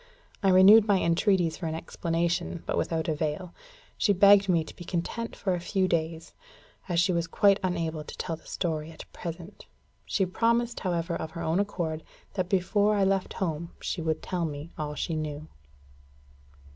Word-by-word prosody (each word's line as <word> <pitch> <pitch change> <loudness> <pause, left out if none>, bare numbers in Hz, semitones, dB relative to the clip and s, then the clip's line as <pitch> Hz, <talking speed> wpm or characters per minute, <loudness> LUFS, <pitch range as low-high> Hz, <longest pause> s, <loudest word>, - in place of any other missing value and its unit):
I 195 - +3
renewed 200 +4 +8
my 200 -2 +4
entreaties 170 -1 +2
for 170 - -4
an 160 - -3
explanation, 170 +1 -2
but - - -1
without 160 -1 -1
avail. 155 +3 -2 0.5
She 205 - +3
begged 200 +1 +6
me 170 -3 +3
to - - -12
be - - -9
content 185 +7 -3
for 190 -2 -1
a 175 - -1
few 185 +2 0
days, 165 -1 -2 0.6
as 170 -1 +2
she 175 +2 +3
was 170 -1 0
quite 200 +2 +4
unable 165 -4 -2
to - - -9
tell 165 - -3
the 160 - -19
story 160 -3 -2
at 160 - -11
present. 170 +3 -8 0.4
She 195 - +1
promised, 235 +5 +1
however, 170 -2 -1
of 160 - -4
her 170 - -4
own 160 +4 +1
accord, 170 -6 -2 0.3
that 185 -2 -2
before 205 +3 +2
I 200 - +2
left 195 -1 +1
home 170 -2 -3
she 175 - -3
would 160 -1 -2
tell 180 -2 -2
me 150 +1 -6
all 150 -1 -4
she 165 - -2
knew. 155 0 -4
175 Hz, 180 wpm, -28 LUFS, 160-195 Hz, 0.6 s, renewed